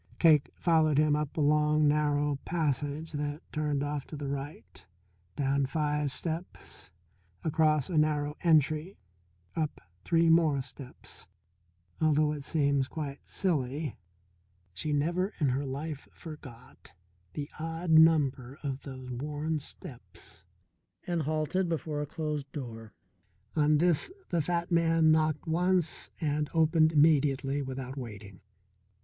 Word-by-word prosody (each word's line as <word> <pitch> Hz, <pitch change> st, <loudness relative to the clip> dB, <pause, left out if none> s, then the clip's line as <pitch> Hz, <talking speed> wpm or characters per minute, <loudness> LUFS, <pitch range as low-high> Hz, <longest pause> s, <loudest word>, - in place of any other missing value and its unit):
Cake 155 Hz, -4 st, +5 dB
followed 160 Hz, -3 st, +3 dB
him 150 Hz, 0 st, +4 dB
along 150 Hz, 0 st, +2 dB
a -, -, +5 dB
narrow 145 Hz, -1 st, +1 dB
passage 150 Hz, -1 st, -2 dB
that 145 Hz, 0 st, -4 dB
turned 150 Hz, -2 st, -1 dB
off 145 Hz, -1 st, -3 dB
to -, -, -8 dB
the 140 Hz, -1 st, -5 dB
right, 140 Hz, +2 st, -6 dB, 0.5 s
down 140 Hz, -1 st, +1 dB
five 150 Hz, 0 st, -1 dB
steps, 165 Hz, +5 st, -5 dB, 0.5 s
across 155 Hz, -3 st, +2 dB
a 165 Hz, -4 st, +1 dB
narrow 150 Hz, -1 st, +1 dB
entry, 155 Hz, +2 st, +2 dB, 0.6 s
up 155 Hz, -2 st, -2 dB, 0.2 s
three 165 Hz, 0 st, +3 dB
more 160 Hz, -4 st, +4 dB
steps 135 Hz, -1 st, -10 dB, 0.7 s
although 155 Hz, -1 st, +3 dB
it 150 Hz, -2 st, -5 dB
seems 140 Hz, -2 st, +1 dB
quite 145 Hz, -2 st, -6 dB
silly, 150 Hz, -5 st, -1 dB, 0.8 s
she 95 Hz, -, -3 dB
never 170 Hz, +7 st, 0 dB
in 145 Hz, -4 st, +2 dB
her 135 Hz, +2 st, -1 dB
life 145 Hz, +2 st, -5 dB
forgot 130 Hz, -7 st, -12 dB, 0.4 s
the 145 Hz, -1 st, -4 dB
odd 165 Hz, +1 st, -3 dB
number 145 Hz, -5 st, +4 dB
of 135 Hz, -2 st, -3 dB
those 130 Hz, -2 st, -8 dB
worn 150 Hz, +5 st, -2 dB
steps 135 Hz, -3 st, -9 dB, 0.6 s
and 175 Hz, -2 st, -1 dB
halted 155 Hz, +4 st, 0 dB
before 155 Hz, -2 st, -2 dB
a 150 Hz, -, -4 dB
closed 150 Hz, -2 st, -4 dB
door. 115 Hz, -6 st, -7 dB, 0.6 s
On 150 Hz, -1 st, +4 dB
this 170 Hz, -, +2 dB, 0.2 s
the 170 Hz, -2 st, +2 dB
fat 170 Hz, +2 st, -2 dB
man 165 Hz, -1 st, +4 dB
knocked 155 Hz, 0 st, +2 dB
once 175 Hz, +1 st, 0 dB
and 150 Hz, -2 st, -1 dB
opened 160 Hz, 0 st, +4 dB
immediately 145 Hz, -3 st, +3 dB
without 130 Hz, 0 st, -5 dB
waiting. 105 Hz, -6 st, -9 dB
150 Hz, 125 wpm, -30 LUFS, 140-160 Hz, 0.8 s, Cake